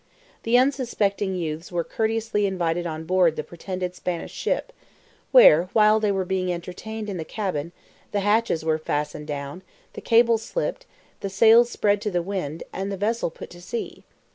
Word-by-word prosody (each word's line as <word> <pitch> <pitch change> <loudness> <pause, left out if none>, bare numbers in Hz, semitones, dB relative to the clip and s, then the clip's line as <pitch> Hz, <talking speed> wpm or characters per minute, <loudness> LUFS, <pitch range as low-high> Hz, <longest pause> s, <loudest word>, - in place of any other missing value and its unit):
The 230 +2 +3
unsuspecting 230 -7 +1
youths 165 -1 -4
were 175 -1 -1
courteously 220 -1 -1
invited 175 -2 -1
on 160 -1 -5
board 180 -1 +3
the 155 - -3
pretended 180 +3 -5
Spanish 180 -2 -4
ship, - - -2 0.6
where, 180 - +7
while 215 0 +5
they 210 -2 +1
were 190 -1 -1
being 185 -1 -1
entertained 210 +5 -6
in 195 -3 -4
the 165 - -3
cabin, 170 -5 -3 0.4
the 205 - 0
hatches 205 -5 +1
were 160 -1 +1
fastened 150 0 -3
down, 145 +3 -5 0.3
the - - -8
cable 230 0 +4
slipped, - - -4 0.3
the 195 - -4
sails 225 +4 +6
spread 205 -3 +1
to 210 - -1
the 175 -3 -1
wind, 170 -5 -4
and 195 +1 -3
the 195 - -3
vessel 220 +1 0
put - - -11
to 175 0 -12
sea. 225 +6 -6
190 Hz, 170 wpm, -24 LUFS, 170-220 Hz, 0.6 s, where